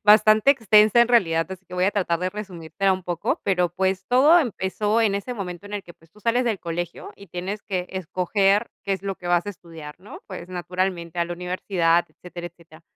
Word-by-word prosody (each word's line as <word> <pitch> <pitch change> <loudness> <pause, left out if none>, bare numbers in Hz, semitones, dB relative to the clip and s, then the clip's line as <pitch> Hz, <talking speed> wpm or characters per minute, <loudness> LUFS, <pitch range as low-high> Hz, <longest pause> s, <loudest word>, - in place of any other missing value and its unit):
bastante 215 +3 +6
extensa 220 -3 +5
en 235 - +6
realidad, 165 -10 +2
así 190 0 -8
que 180 - -11
voy 180 - +1
a 200 - +2
tratar 175 -5 0
de 185 - -1
resumírtela 190 -2 -2
un 185 -1 -4
poco. 175 -2 -2
Pero, 180 -3 +2
pues, 190 +1 -1
todo 290 +8 +6
empezó 210 - -1
en 210 -3 +2
ese 200 +5 -3
momento 180 -5 -6
en 205 - -7
el 200 - -4
que, 175 - -13
pues, 165 0 -25
tú 210 - -21
sales 235 +3 +1
del 220 -5 0
colegio 170 0 -5
y 200 - -15
tienes 185 +5 -5
que 180 -2 -3
escoger 195 +4 +1 0.2
qué 195 - -1
es 190 - -3
lo 195 -1 -2
que 175 -1 -8
vas 175 +2 +2
a - - -2
estudiar, 165 -5 -11
¿no? 200 - -12
Pues, 185 -2 -8
naturalmente 180 -1 -3
a 170 - +3
la 175 - -5
universidad, 180 -1 +1
etcétera, 175 -1 -9
etcétera. 165 -1 -19
185 Hz, 220 wpm, -23 LUFS, 175-210 Hz, 0.2 s, bastante